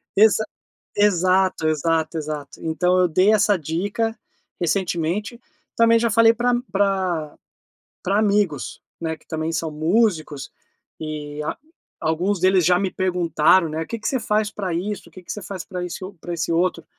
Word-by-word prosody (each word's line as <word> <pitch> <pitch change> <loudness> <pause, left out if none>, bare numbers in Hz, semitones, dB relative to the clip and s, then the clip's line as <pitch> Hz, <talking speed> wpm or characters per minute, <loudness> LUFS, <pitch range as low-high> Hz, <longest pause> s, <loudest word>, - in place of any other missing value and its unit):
Exa 220 +1 +5 0.5
exato, 185 -4 +3
exato, 160 +1 0
exato. 150 -2 -6
Então 180 +3 +1
eu 180 - +4
dei 185 +6 +4
essa 210 -1 +4
dica 200 +9 -2 0.4
recentemente. 180 +5 -1 0.4
Também 230 0 +5
já 230 0 +1
falei 225 +1 +6
pra 240 +2 +1
a - - +3 0.2
pra 185 -6 0 0.6
pra 195 +2 +1
amigos, 200 - 0 0.2
né, 160 -1 -2
que - - -28
também 160 0 -3
são 165 0 -1
músicos, 160 -2 0 0.5
e 150 -1 -5
a 150 - -3 0.4
alguns 175 +5 0
deles 185 -1 +4
já 180 +1 +4
me 190 0 -1
perguntaram, 180 -2 +2
né: 155 +1 -3
"O - - -6
que 230 - -5
que - - -3
você 260 - 0
faz 210 -1 0
pra 190 -5 -4
isso? 200 +4 -4
O - - -23
que 185 - -12
que - - -6
você 210 - -6
faz 185 -2 -6
pra 180 -2 -5
esse 180 +1 -6
o 195 +2 -8
esse 170 -1 -1
outro?", 170 -1 0
180 Hz, 170 wpm, -22 LUFS, 160-205 Hz, 0.6 s, falei